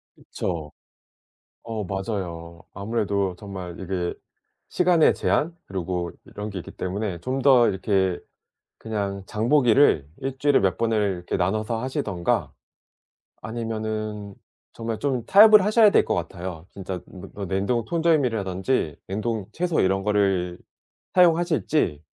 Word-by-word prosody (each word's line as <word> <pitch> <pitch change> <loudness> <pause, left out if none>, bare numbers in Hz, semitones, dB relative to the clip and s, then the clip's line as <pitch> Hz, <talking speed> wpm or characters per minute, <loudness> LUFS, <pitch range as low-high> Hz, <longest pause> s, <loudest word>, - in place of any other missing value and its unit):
그쵸. 80 -5 -5 0.9
어. 110 -2 -4
맞아요. 90 -4 -5
아무래도 100 -2 -1
정말 95 -4 -8
이게 90 -2 -2 0.6
시간의 175 -3 +4
제한 165 +3 0
그리고 90 -2 -3
이런 105 +1 -7
게 95 -2 -5
있기 - - -9
때문에 95 -1 -4
좀 130 +8 -3
더 130 -3 +6
이렇게 95 -1 0 0.6
그냥 100 -3 -3
장 110 +3 -2
보기를 125 - +4
1 135 0 -4
주일에 145 +1 +4
몇 95 -2 +1
번을 110 -4 +1
이렇게 90 - -3
나눠서 110 +5 -1
하시든가 115 - -1 0.9
아니면은 110 -2 -4 0.4
정말 115 -1 -4
좀 130 -5 -1
타협을 210 0 +8
하셔야 215 0 +5
될 - - +4
것 - - 0
같아요. 85 -1 -5
진짜 95 -2 -6
뭐 95 - -11
뭐 100 -1 -6
냉동 100 +6 0
통조림이라든지 125 - 0
냉동 110 +1 -3
채소 175 -1 0
이런 95 +1 +2
거를 95 -4 +1 0.6
사용하실지 160 - +2
105 Hz, 275 characters per minute, -24 LUFS, 95-125 Hz, 0.9 s, 타협을